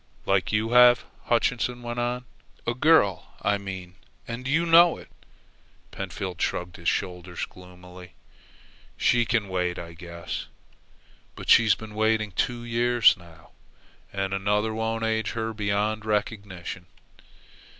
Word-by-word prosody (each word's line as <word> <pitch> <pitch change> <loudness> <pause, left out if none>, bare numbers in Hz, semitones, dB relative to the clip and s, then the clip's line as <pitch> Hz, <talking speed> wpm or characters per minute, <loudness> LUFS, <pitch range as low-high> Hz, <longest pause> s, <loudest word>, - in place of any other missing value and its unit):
"Like 95 -3 +1
you 110 +2 0
have," 125 0 +7 0.2
Hutchinson 120 +1 0
went 120 0 -4
on. 125 +1 -2 0.4
"A 120 - 0
girl, 130 -6 +3
I 100 0 +1
mean, 95 -2 -8 0.3
and 120 +2 -5
you 160 +5 +2
know 170 +1 +6
it." - - -13 0.8
Pentfield 90 -3 -5
shrugged 90 0 -2
his 85 0 0
shoulders 90 -1 -3
gloomily. 90 0 -14 0.8
"She 120 -1 +3
can 115 -3 0
wait, 90 -2 -1
I 85 -1 -8
guess." 85 -1 -7 0.9
"But - - -2
she's 115 -2 +6
been 110 -1 -10
waiting 110 0 +1
two 120 +5 -2
years 120 0 +4
now." 85 -4 -17 0.6
"And 95 0 -2
another 105 +3 0
won't 110 +1 -2
age 110 0 0
her 115 -1 -3
beyond 105 +1 -1
recognition." 100 -4 -3
105 Hz, 130 wpm, -26 LUFS, 90-120 Hz, 0.9 s, have